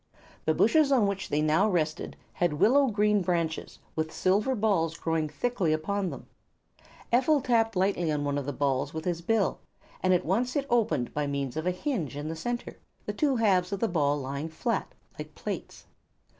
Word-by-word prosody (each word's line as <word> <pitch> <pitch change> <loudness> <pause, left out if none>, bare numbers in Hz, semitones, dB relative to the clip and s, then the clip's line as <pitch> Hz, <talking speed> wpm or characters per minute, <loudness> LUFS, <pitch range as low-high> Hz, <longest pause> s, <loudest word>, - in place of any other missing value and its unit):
The - - +2
bushes 310 -3 +4
on 250 -6 +4
which 200 -1 -2
they 150 +1 +1
now 160 +7 +3
rested 160 -4 -1 0.2
had 175 -3 +1
willow 265 - +4
green 210 -2 +2
branches 170 -3 -2 0.2
with 160 0 -2
silver 205 +8 +1
balls 185 -7 +1
growing 160 -2 -1
thickly 175 +1 0
upon 190 +5 -1
them. - - -8 0.9
Ephel 270 +5 +4
tapped 225 -4 +1
lightly 185 -3 +1
upon 150 -1 0
one 145 0 0
of 140 - -6
the - - 0
balls 140 +1 -1
with 160 - -4
his 175 -2 -1
bill 210 +2 +1 0.4
and 185 - +2
at 180 - +2
once 240 +8 0
it 280 -2 0
opened 225 - +1
by 150 -1 -1
means 140 -2 -3
of 160 +3 -2
a - - +4
hinge 180 - -3
in 150 +2 -4
the 165 - -3
center, 240 +9 -4 0.3
the - - -3
two 290 -4 +1
halves 195 -6 +2
of 200 - -2
the 230 - +1
ball 145 -5 +1
lying 140 +3 -4
flat, 225 +9 -2 0.3
like - - -8
plates. - - -6
180 Hz, 190 wpm, -28 LUFS, 155-225 Hz, 0.9 s, bushes